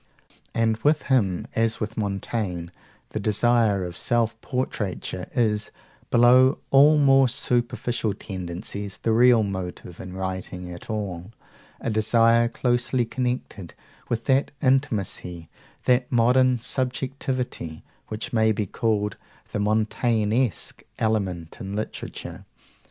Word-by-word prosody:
And 115 Hz, -1 st, +2 dB
with 150 Hz, +6 st, +2 dB
him, 100 Hz, -10 st, +1 dB
as 115 Hz, 0 st, +1 dB
with 110 Hz, 0 st, -4 dB
Montaigne, 100 Hz, -4 st, -3 dB, 0.4 s
the -, -, -3 dB
desire 105 Hz, -2 st, +2 dB
of 85 Hz, -1 st, -7 dB
self 115 Hz, +3 st, 0 dB
portraiture 105 Hz, -8 st, -3 dB
is, 110 Hz, -3 st, +1 dB, 0.4 s
below 125 Hz, +3 st, +6 dB
all 145 Hz, +3 st, +7 dB
more 135 Hz, -2 st, +5 dB
superficial 120 Hz, -2 st, -1 dB
tendencies, 95 Hz, +1 st, -6 dB
the 115 Hz, -, 0 dB
real 120 Hz, -1 st, +6 dB
motive 90 Hz, -3 st, -5 dB
in 95 Hz, -1 st, -8 dB
writing 95 Hz, -1 st, -5 dB
at 85 Hz, +5 st, -10 dB
all 100 Hz, -4 st, -4 dB, 0.5 s
a 115 Hz, -, -2 dB
desire 115 Hz, +2 st, +4 dB
closely 120 Hz, 0 st, 0 dB
connected 125 Hz, -7 st, -4 dB, 0.3 s
with 115 Hz, -1 st, -2 dB
that 135 Hz, 0 st, +3 dB
intimacy, 105 Hz, -, 0 dB, 0.4 s
that 125 Hz, 0 st, +2 dB
modern 125 Hz, +2 st, +4 dB
subjectivity, 130 Hz, -, -3 dB, 0.2 s
which 110 Hz, 0 st, -5 dB
may 110 Hz, -1 st, +4 dB
be 105 Hz, -1 st, -1 dB
called 105 Hz, -1 st, -1 dB, 0.3 s
the -, -, -2 dB
Montaignesque 110 Hz, +1 st, 0 dB, 0.2 s
element 95 Hz, -7 st, -1 dB
in 100 Hz, +1 st, -5 dB
literature. 110 Hz, -, -6 dB
110 Hz, 115 wpm, -24 LUFS, 100-125 Hz, 0.5 s, all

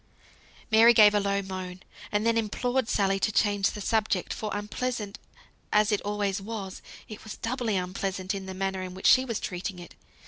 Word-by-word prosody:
Mary 230 Hz, +2 st, +7 dB
gave 210 Hz, -1 st, +8 dB
a 205 Hz, -, +3 dB
low 200 Hz, 0 st, 0 dB
moan, 185 Hz, -1 st, -6 dB, 0.3 s
and 210 Hz, +1 st, 0 dB
then 230 Hz, 0 st, +3 dB
implored 245 Hz, +3 st, 0 dB
Sally 195 Hz, -1 st, +1 dB
to 215 Hz, -, +1 dB
change 205 Hz, -1 st, +2 dB
the 210 Hz, -, -7 dB
subject; 210 Hz, -3 st, 0 dB
for 215 Hz, -, -4 dB
unpleasant 210 Hz, +1 st, -3 dB, 0.5 s
as 210 Hz, +1 st, +3 dB
it 210 Hz, -, +1 dB
always 205 Hz, -1 st, -1 dB
was, 195 Hz, -2 st, -6 dB, 0.3 s
it 215 Hz, -, -10 dB
was 220 Hz, -, -8 dB
doubly 230 Hz, -2 st, -2 dB
unpleasant 190 Hz, +1 st, -2 dB
in 195 Hz, -1 st, -5 dB
the 190 Hz, -, -6 dB
manner 190 Hz, 0 st, -2 dB
in 185 Hz, -1 st, -6 dB
which 190 Hz, -, -9 dB
she 260 Hz, -, +6 dB
was 230 Hz, -4 st, -2 dB
treating 180 Hz, +1 st, -4 dB
it. 175 Hz, -2 st, -11 dB
205 Hz, 185 wpm, -27 LUFS, 190-220 Hz, 0.5 s, gave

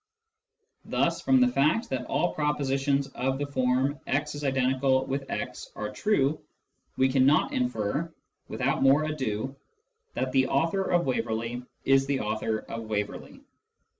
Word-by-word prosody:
Thus -, -, 0 dB
from 265 Hz, -, +4 dB
the 250 Hz, -, +6 dB
fact 225 Hz, -, +2 dB
that -, -, -2 dB
all 175 Hz, -, 0 dB
propositions 140 Hz, -2 st, 0 dB
of 130 Hz, +1 st, -2 dB
the 145 Hz, -, -2 dB
form 130 Hz, +1 st, 0 dB
" -, -, -34 dB
x=x 135 Hz, -, -1 dB
" -, -, -36 dB
are -, -, -4 dB
true 155 Hz, -9 st, +1 dB, 0.6 s
we 130 Hz, -, +4 dB
cannot 135 Hz, +3 st, +3 dB
infer, 125 Hz, +6 st, -1 dB, 0.4 s
without -, -, -1 dB
more 135 Hz, +3 st, +5 dB
ado, 135 Hz, -4 st, -3 dB, 0.6 s
that 130 Hz, +1 st, -1 dB
the 130 Hz, 0 st, +3 dB
author 165 Hz, +8 st, +1 dB
of 175 Hz, -1 st, +2 dB
Waverley 120 Hz, -1 st, -2 dB, 0.2 s
is 135 Hz, 0 st, +4 dB
the 140 Hz, -1 st, 0 dB
author 110 Hz, +1 st, -1 dB
of -, -, -14 dB
s 110 Hz, -, -10 dB
Waverley. 105 Hz, -1 st, -4 dB
135 Hz, 135 wpm, -27 LUFS, 130-145 Hz, 0.6 s, the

